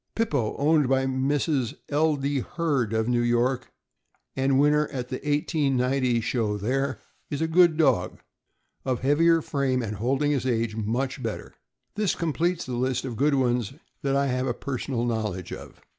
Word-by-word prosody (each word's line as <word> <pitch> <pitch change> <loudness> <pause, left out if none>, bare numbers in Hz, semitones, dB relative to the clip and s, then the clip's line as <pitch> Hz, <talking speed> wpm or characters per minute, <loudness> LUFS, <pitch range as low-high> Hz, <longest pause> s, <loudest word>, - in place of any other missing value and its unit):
Pippo, 145 - 0
owned 150 -2 +3
by 135 0 +2
Mrs. 135 -1 0
L. 155 +1 +2
D. 140 0 -1
Hurd, 140 -5 -1
of 110 0 0
New 120 -1 +2
York, 120 +2 0 0.6
and 135 0 +2
win 145 +1 +5
ner 150 0 +2
at 125 -3 -5
the 130 - -3
1890 135 -4 +1
show 110 -3 -1
there, 135 +7 -1 0.3
is 145 - -3
a 160 - +1
good 170 -1 +4
dog, 90 - +2 0.6
of 130 -2 -1
heavier 165 +4 +3
frame 130 -3 0
and 105 -1 -4
holding 135 +7 +1
his 130 -3 0
age 115 -3 0
much 120 +5 -2
better. - - -5 0.4
This 210 -3 0
completes 170 +2 -1
the 130 - -5
list 130 +1 -1
of 125 -3 -4
good 140 +5 +2
ones 125 -3 0 0.3
that 135 -1 0
I 140 0 +2
have 130 0 -1
a 120 - -1
personal 125 -2 -3
knowledge 105 -6 -3
of. - - -10
130 Hz, 170 wpm, -26 LUFS, 120-145 Hz, 0.6 s, win